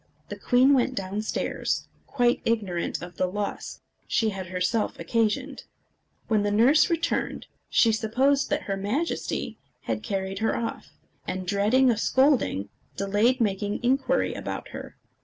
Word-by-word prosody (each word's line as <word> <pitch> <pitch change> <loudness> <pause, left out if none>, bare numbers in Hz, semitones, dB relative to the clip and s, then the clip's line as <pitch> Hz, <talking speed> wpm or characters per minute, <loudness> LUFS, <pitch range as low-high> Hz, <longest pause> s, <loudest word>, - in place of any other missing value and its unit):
The 205 - -5
queen 250 +6 +4
went 260 -1 +2
down 195 +2 -3
stairs, 215 - -2 0.2
quite 245 -3 +1
ignorant 200 -8 -1
of 175 -1 -10
the 185 - +1
loss 205 +2 -4 0.3
she 225 -2 +1
had 190 -2 -5
herself 185 +5 -1
occasioned. 235 +5 -1 0.6
When 215 -2 +2
the 205 - 0
nurse 240 +9 +5
returned, 335 -1 -1 0.2
she 230 - +4
supposed 255 +6 +1
that - - -1
her 195 - -2
Majesty 220 +13 -2 0.2
had - - -3
carried 195 -2 -3
her 225 - 0
off, 230 - -4 0.4
and, 185 0 -3
dreading 215 +7 +3
a 225 - -1
scolding, 260 - +2 0.3
delayed 205 +6 +2
making 205 0 -1
inquiry 265 +2 +1
about - - -5
her. - - -9
220 Hz, 140 wpm, -26 LUFS, 195-255 Hz, 0.6 s, nurse